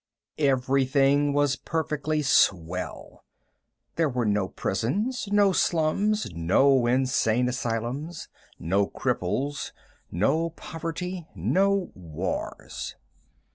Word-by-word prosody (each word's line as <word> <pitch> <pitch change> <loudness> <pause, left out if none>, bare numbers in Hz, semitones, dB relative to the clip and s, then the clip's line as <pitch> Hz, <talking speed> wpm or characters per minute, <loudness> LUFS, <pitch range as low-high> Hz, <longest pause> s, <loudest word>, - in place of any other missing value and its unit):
Everything 135 +1 +3
was 145 -1 +2
perfectly 155 -1 -2
swell. 90 - 0 0.7
There 165 -2 +2
were 125 -2 -1
no 105 -2 +1
prisons, 205 - -2
no 205 -1 +5
slums, 185 +6 +1
no 120 +10 +3
insane 125 -2 +2
asylums, 125 +6 -3 0.3
no 100 +4 +1
cripples, 145 +2 -2 0.4
no 155 - +1
poverty, 165 +2 -6
no 195 0 +1
wars. 90 0 -5
140 Hz, 85 wpm, -26 LUFS, 115-165 Hz, 0.7 s, no